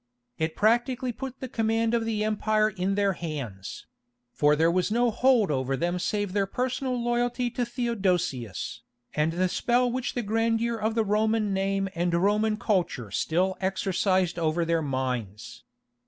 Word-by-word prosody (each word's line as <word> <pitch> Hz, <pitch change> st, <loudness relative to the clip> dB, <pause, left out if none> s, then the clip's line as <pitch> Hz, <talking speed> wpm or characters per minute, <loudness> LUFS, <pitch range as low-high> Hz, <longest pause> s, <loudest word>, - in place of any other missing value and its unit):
It 160 Hz, 0 st, -1 dB
practically 240 Hz, +3 st, +2 dB
put 265 Hz, +2 st, -7 dB
the 260 Hz, -, -3 dB
command 225 Hz, -1 st, 0 dB
of 230 Hz, -1 st, +1 dB
the 215 Hz, -2 st, -1 dB
empire 215 Hz, 0 st, +1 dB
in 190 Hz, +1 st, -1 dB
their 200 Hz, -1 st, +2 dB
hands; 140 Hz, -, -6 dB, 0.5 s
for 150 Hz, 0 st, +3 dB
there 165 Hz, +2 st, +3 dB
was 180 Hz, +2 st, +1 dB
no 240 Hz, +2 st, +2 dB
hold 240 Hz, -5 st, +3 dB
over 135 Hz, -1 st, -1 dB
them 175 Hz, +3 st, -1 dB
save 205 Hz, 0 st, -1 dB
their 200 Hz, -1 st, +1 dB
personal 255 Hz, +3 st, -2 dB
loyalty 240 Hz, +1 st, 0 dB
to 245 Hz, -, -1 dB
Theodosius, 185 Hz, -, -1 dB, 0.3 s
and 155 Hz, +2 st, +1 dB
the 185 Hz, +2 st, +1 dB
spell 245 Hz, +6 st, +1 dB
which 255 Hz, 0 st, -3 dB
the 245 Hz, -, -1 dB
grandeur 225 Hz, +2 st, +1 dB
of 220 Hz, +1 st, -1 dB
the 225 Hz, -2 st, +2 dB
Roman 215 Hz, 0 st, +1 dB
name 195 Hz, 0 st, 0 dB
and 175 Hz, 0 st, 0 dB
Roman 210 Hz, +4 st, +2 dB
culture 180 Hz, -, -1 dB
still 185 Hz, -, +1 dB
exercised 190 Hz, -1 st, +1 dB
over 165 Hz, +1 st, +1 dB
their 165 Hz, 0 st, +1 dB
minds. 125 Hz, -7 st, -4 dB
205 Hz, 155 wpm, -27 LUFS, 170-230 Hz, 0.5 s, for